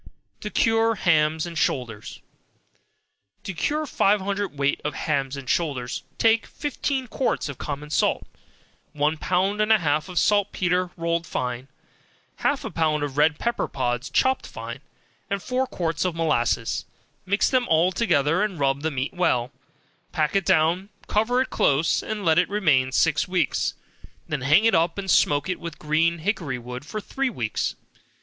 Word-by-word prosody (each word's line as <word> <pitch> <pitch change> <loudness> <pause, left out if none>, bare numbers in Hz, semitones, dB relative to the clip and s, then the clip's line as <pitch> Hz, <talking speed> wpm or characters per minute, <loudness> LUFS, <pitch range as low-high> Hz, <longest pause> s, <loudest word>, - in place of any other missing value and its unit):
To 210 - -5
Cure 225 +1 +2
Hams 160 -4 +2
and 170 -1 -7
Shoulders. 120 -8 -2 1.2
To 195 - -5
cure 300 - -1
five 210 -6 +2
hundred 200 -4 -3
weight 140 0 0
of 150 -1 -3
hams 140 -2 -1
and 135 -2 -8
shoulders, 140 -6 -1 0.2
take 225 0 +3
fifteen 280 -2 -3
quarts 250 -4 -1
of 140 -3 -7
common 150 +1 -5
salt, - - +1 0.7
one 150 +1 +1
pound 190 +6 0
and 215 +1 +2
a 220 - +7
half 155 -1 0
of 180 - -7
saltpetre 185 -1 +2
rolled 170 0 -1
fine, 125 +1 -3 0.7
half - - 0
a - - -4
pound 155 -2 +1
of 140 -2 -4
red 150 +1 +3
pepper 235 0 -1
pods 120 0 -2
chopped 260 0 +1
fine, - - -7 0.5
and 200 -2 -2
four 255 +1 -1
quarts 165 -7 -2
of 180 -3 -1
molasses; 120 -8 0 0.4
mix 200 +2 +2
them 255 -2 +1
all 165 +3 +3
together 170 -5 +2
and 205 -6 -1
rub 135 0 +1
the 160 - 0
meat 135 -1 -3
well, 125 -9 +1 0.6
pack 155 -1 0
it 195 -2 +2
down, 170 +5 +2 0.2
cover 240 +4 +1
it - - -12
close, 145 +4 +2
and 210 -3 -4
let 160 0 +5
it 180 - +1
remain 150 -11 +2
six 155 +2 +2
weeks, 180 -6 0 0.5
then 150 -4 -3
hang 150 - +4
it 225 - +4
up 165 +2 +2
and 195 -2 -1
smoke 145 +2 +3
it 185 - -2
with 170 -3 -7
green 160 +3 +1
hickory 165 - -2
wood 125 +2 -7
for 215 - -4
three 270 +5 -2
weeks. 120 - -2
165 Hz, 165 wpm, -24 LUFS, 145-200 Hz, 1.2 s, a